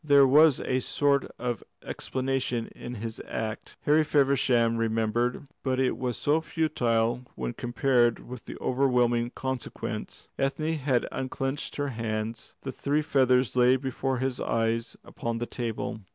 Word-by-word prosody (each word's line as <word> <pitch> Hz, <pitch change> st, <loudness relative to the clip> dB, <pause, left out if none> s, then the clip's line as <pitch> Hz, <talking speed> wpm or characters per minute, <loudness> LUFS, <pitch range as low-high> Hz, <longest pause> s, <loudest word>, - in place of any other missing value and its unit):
There 140 Hz, -2 st, +6 dB
was 150 Hz, +1 st, +6 dB
a 130 Hz, -, 0 dB
sort 140 Hz, +2 st, +1 dB
of 120 Hz, -4 st, -2 dB, 0.2 s
explanation 130 Hz, -3 st, -2 dB
of 120 Hz, -, -7 dB
his 115 Hz, +1 st, -5 dB
act, 110 Hz, 0 st, -5 dB
Harry 155 Hz, +1 st, +4 dB
Feversham 135 Hz, -5 st, +3 dB
remembered; 115 Hz, +3 st, 0 dB, 0.2 s
but 130 Hz, -1 st, 0 dB
it 130 Hz, -1 st, +2 dB
was 125 Hz, -2 st, -2 dB
so 150 Hz, +3 st, +2 dB
futile 120 Hz, -7 st, +1 dB
when 60 Hz, -1 st, -3 dB
compared 120 Hz, -1 st, +2 dB
with 125 Hz, -1 st, -8 dB
the -, -, -7 dB
overwhelming 125 Hz, -2 st, +2 dB
consequence. 130 Hz, -2 st, -5 dB
Ethne 155 Hz, +4 st, 0 dB
had 130 Hz, -3 st, +1 dB
unclenched 135 Hz, +1 st, -3 dB
her 145 Hz, -1 st, -1 dB
hands; 110 Hz, -1 st, -4 dB
the 135 Hz, -, -3 dB
three 145 Hz, +3 st, 0 dB
feathers 130 Hz, -5 st, +3 dB
lay 125 Hz, +1 st, +5 dB
before 130 Hz, 0 st, -2 dB
his 130 Hz, 0 st, -2 dB
eyes 115 Hz, 0 st, -1 dB
upon 115 Hz, 0 st, -4 dB
the 120 Hz, -, -2 dB
table. 120 Hz, -1 st, -4 dB
125 Hz, 140 wpm, -28 LUFS, 115-135 Hz, 0.2 s, There